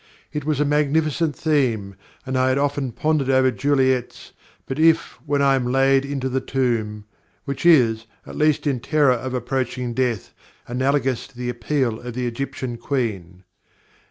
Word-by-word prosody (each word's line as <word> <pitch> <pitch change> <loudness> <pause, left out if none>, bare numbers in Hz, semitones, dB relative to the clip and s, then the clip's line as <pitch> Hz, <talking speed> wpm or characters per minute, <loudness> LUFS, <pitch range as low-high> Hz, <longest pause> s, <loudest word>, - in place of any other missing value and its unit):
It 150 -1 -3
was 150 -2 0
a 150 - +3
magnificent 150 +1 +1
theme, 120 -11 0 0.3
and 130 0 -3
I 130 0 +3
had 130 - +1
often 140 -2 -1
pondered 150 +1 0
over 130 -1 +4
Juliet's 130 -3 0 0.3
'But 135 +3 -5
if, 165 +1 +3
when 145 0 +1
I 135 -1 +4
am 125 -2 0
laid 135 +1 +3
into 140 -2 -3
the 130 0 -1
tomb,' 110 -5 -1 0.4
which 140 +4 -2
is, 115 -8 +4 0.2
at - - -10
least 155 0 +2
in 135 -4 0
terror 145 +1 +3
of 130 +1 -4
approaching 125 0 -2
death, 120 -5 -1 0.3
analogous 130 0 0
to 135 -3 -22
the 125 0 -3
appeal 120 -1 -1
of 120 -1 -8
the 125 0 -2
Egyptian 130 0 -4
Queen." 100 -9 -3
130 Hz, 160 wpm, -22 LUFS, 120-145 Hz, 0.4 s, over